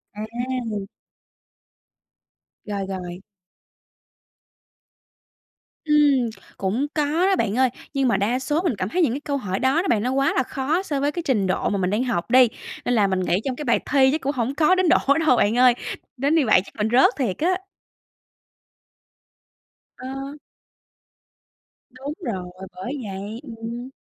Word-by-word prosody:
À! 230 -1 -4 1.8
Rồi, 200 -2 -3
rồi. 180 -1 -6 2.6
Ừm, 290 -5 +4 0.3
cũng 220 +9 -1
có 300 -2 +1 0.2
đó, 390 - +3
bạn 225 - -1
ơi. 260 0 +4 0.2
Nhưng 275 -2 +1
mà 235 - +2
đa 230 +6 0
số 295 +5 0
mình 345 - 0
cảm 190 -1 -3
thấy 360 - 0
những 295 -9 +2
cái 275 - -3
câu 290 -1 -2
hỏi 195 -6 -3
đó 265 +6 +2
đó 385 - -3
bạn, 215 -3 +2
nó 250 - 0
quá 275 +1 +2
là 260 - +2
khó 290 +9 -1
so 290 -7 -2
với 285 +1 +1
cái 345 +2 -4
trình 220 - +1
độ 185 - 0
mà 205 - -1
mình 185 -1 0
đang 210 +5 0
học 230 -5 -2
đi. 255 -1 +7 0.4
Nên 245 - +1
là 210 -3 +4
mình 190 -1 0
nghĩ 180 -1 +1
trong 265 -2 -1
cái 295 - -6
bài - - +3
thi 265 -2 +5
chắc 310 - -1
cũng 275 - 0
hổng 250 +2 -1
có 310 +4 +4
đến 370 -2 +2
độ - - +6 0.3
đâu 250 - +5
bạn 215 +2 +2
ơi, 250 0 +6 0.4
đến 280 +5 +1
như 315 -4 +3
vậy 215 -5 +5
chắc - - -16
mình 215 0 -1
rớt 250 +2 +6
thiệt 235 -10 -1
á. 360 +4 +1 2.4
Ờ. 270 +2 -6 1.6
Đúng 270 +4 -7
rồi, 185 - -4 0.2
bởi 245 +10 -5
vậy, 200 +4 -6 0.2
ừm. 235 +3 -6
255 Hz, 170 wpm, -23 LUFS, 210-280 Hz, 2.6 s, đi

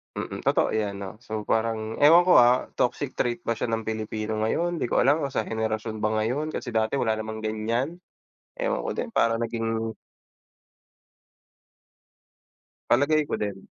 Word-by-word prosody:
Mm. - - -5
Totoo - - +3
'yan 105 -2 -1
'no, 100 +2 -7
so 110 -1 -3
parang 110 0 -1
ewan 165 +4 +7
ko, 180 0 +5
ah, 125 +1 +5
toxic 130 +2 -1
trait 120 -1 -1
ba 115 -1 -2
siya - - -1
ng 115 -1 -1
Pilipino 110 0 -3
ngayon? 175 +8 0
'Di 145 - -1
ko - - +2
alam 140 +5 +4
kung 135 - -6
sa - - +1
henerasyon 110 0 -3
ba 105 0 0
ngayon? 145 +8 -1
Kasi - - -4
dati 110 0 0
wala 110 -1 +1
namang 110 0 -5
ganyan, 115 +9 -2 0.6
ewan - - -1
ko - - -4
din 235 -2 -4
parang 115 - +3
naging 115 -1 -2 3.0
Palagay 145 +5 +4
ko - - -1
din. 100 -2 -4
115 Hz, 160 wpm, -26 LUFS, 110-130 Hz, 3.0 s, ewan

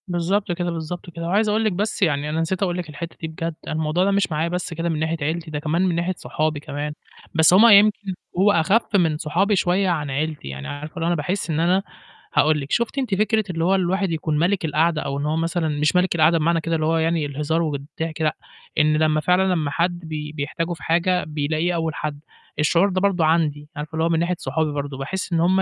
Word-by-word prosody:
بالضبط 185 +3 0
كده، 175 0 -2
بالضبط 170 +2 -5
كده، 165 0 -6
وعايز 210 +4 +2
أقول 215 +2 +1
لِك 215 - +2
بس 210 +4 -2
يعني 150 -4 +1
أنا 160 +2 -1
نسيت 185 +4 -1
أقول 175 -2 -1
لِك 175 -3 -5
الحتّة 165 +3 -7
دي 160 - -3
بجد، 165 +1 -4
أنا - - -2
الموضوع 160 +3 +1
ده 200 - +2
مش 200 -3 +1
معايا 155 +2 0
بس 180 -1 -3
كده 165 +1 -2
من 160 -2 -1
ناحية 160 +1 -1
عيلتي، 160 +2 -2
ده 150 - -2
كمان 155 +3 0
من 185 -3 +1
ناحية 170 +2 0
صحابي 155 -1 -2
كمان، 145 0 -5 0.4
بس 160 +1 +5
هُم 210 +5 +8
يمكن 205 -1 +5 0.3
هو 205 +2 +5
أخَف 200 +6 +2
من 165 -5 +3
صحابي 185 +8 +1
شوية 185 +1 +2
عن 150 -5 -1
عيلتي، 150 - -3
يعني 70 0 -6
عارفة 150 +2 -7
اللي 165 -2 -2
هو - - +1
أنا 175 - +2
باحس 175 +5 -2
إن 155 -1 0
أنا 180 +4 +2 0.5
هاقول 155 0 +3
لِك. 140 - -8
شُفتِ 235 +3 0
أنتِ 250 -7 0
فكرة 215 +2 +2
اللي 165 -2 -2
هو 190 +3 +3
الواحد 190 0 0
يكون 155 -2 -1
ملك 180 +2 +1
القعدة 160 +1 +1
أو 140 0 -3
إن 145 - -2
هو 155 +1 0
مثلًا 165 0 0
مش 150 +2 0
ملك 180 -1 +2
القعدة 165 +1 +4
بمعنى 165 +1 +1
كده 165 +1 -1
اللي 155 -1 0
هو 165 +1 +2
يعني 160 -1 +1
الهزار 150 +3 -1
والضحك 155 +1 -4
لأ، 155 -1 +1 0.4
إن 155 0 +4
لمّا 155 0 +2
فعلًا 180 +4 +3
لمّا 155 -5 -1
حد 175 +2 0
بي 155 -3 -6
بيحتاجوا 155 +3 -3
في 160 - -11
حاجة 175 +2 +2
بيلاقيه 155 +3 -1
أول 160 -2 -2
حد. 150 -1 -4 0.4
الشعور 170 +6 +3
ده 185 -1 -1
برضه 190 -5 +2
عندي، 150 -2 +1
عارفة 150 0 -5
اللي 160 0 0
هو 165 - +2
من 165 -1 +2
ناحية 175 +2 0
صحابي 160 -2 -1
برضه، 145 -1 -4
باحس 180 +7 -4
إن 165 - +2
هُم 185 +3 +3
165 Hz, 240 wpm, -22 LUFS, 155-180 Hz, 0.5 s, هُم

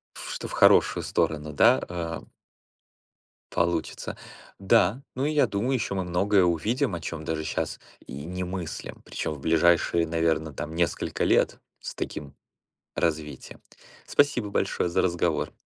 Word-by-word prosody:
Фш - - -6
что - - -5
в - - -8
хорошую - - +5
сторону, 75 -1 -1
да, 65 -2 +5
э 85 -2 -4 1.3
получится. 85 -4 -1 0.4
Да. 100 +5 +3
Ну, 130 - 0
и 155 - 0
я 150 - +4
думаю, 105 +6 -1
ещё 115 -5 -1
мы 95 - -1
многое 95 +2 +3
увидим, 105 - +1
о 85 - -4
чём 80 -1 -5
даже 80 0 -2
щас - - -3 0.3
и - - -9
не 90 +2 -4
мыслим. 90 -2 -6
Причём, - - -3
в 75 - -11
ближайшие, 85 +2 +3
наверно, 80 -1 0
там, 75 +4 -5
несколько 85 0 0
лет. - - +3 0.2
С - - -6
таким 70 -3 -6 0.6
развитием. 75 -2 -3 0.5
Спасибо 145 -7 +2
большое 95 - 0
за 85 - +2
разговор. 85 -2 0
85 Hz, 145 wpm, -26 LUFS, 80-95 Hz, 1.3 s, хорошую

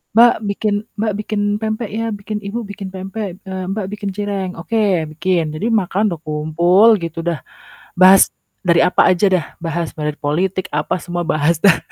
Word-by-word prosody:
"Mbak 235 +1 +7
bikin 205 +1 -1 0.3
Mbak 215 0 0
bikin 215 0 -2 0.2
pempek 220 0 -2
ya. 225 +2 -2
Bikin 205 +1 -5
Ibu 220 +4 -3
bikin 200 -1 -7
pempek, 195 +2 -5
eee, 190 -2 -5
Mbak 205 0 -2
bikin 205 -1 -4
cireng." 200 -3 -3
"Oke 195 -1 0
bikin." 170 -2 0
Jadi 200 +8 -2
makan 205 0 +1
udah 165 - -7
kumpul 170 +7 +3
gitu, 165 0 -5
dah 170 -3 -1 0.6
bahas 185 +1 +6 0.3
dari 170 -1 +5
apa - - +4
aja 185 +2 +3
dah, 180 -4 +2 0.2
bahas 165 0 -3
muali 150 -1 -2
dari 150 - -12
politik 180 +6 -1
apa, 150 +4 0
semua 175 0 -4
bahas 155 0 +1
dah. 195 -4 +6
190 Hz, 175 wpm, -18 LUFS, 170-205 Hz, 0.6 s, Mbak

